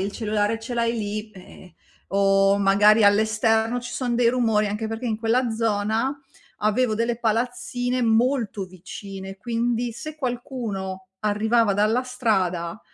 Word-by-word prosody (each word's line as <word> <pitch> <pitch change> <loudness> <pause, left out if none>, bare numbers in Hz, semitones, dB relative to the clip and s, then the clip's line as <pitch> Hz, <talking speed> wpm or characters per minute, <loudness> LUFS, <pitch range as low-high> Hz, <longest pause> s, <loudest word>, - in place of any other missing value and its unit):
il 195 +1 -2
cellulare 215 0 -1
ce 235 +3 -7
l'hai 235 -1 +1
lì, 215 0 -4
ehm, 185 -2 -15 0.4
o 195 0 +4
magari 205 +2 +5
all'esterno 220 +3 +2
ci 245 0 -7
sono 245 -2 -2
dei 235 -1 +3
rumori, 225 -4 +2
anche 210 +2 -3
perché 225 +2 -5
in 220 -3 -1
quella 235 +2 +1
zona 225 +4 0 0.4
avevo 215 +2 +2
delle 230 +1 -1
palazzine 245 +2 -1
molto 230 -2 +1
vicine, 190 +1 -9
quindi 235 +2 -1
se 310 +6 -8
qualcuno 230 -8 -4
arrivava 215 0 +2
dalla 215 +5 +2
strada 190 -9 -1
220 Hz, 135 wpm, -24 LUFS, 205-240 Hz, 0.4 s, magari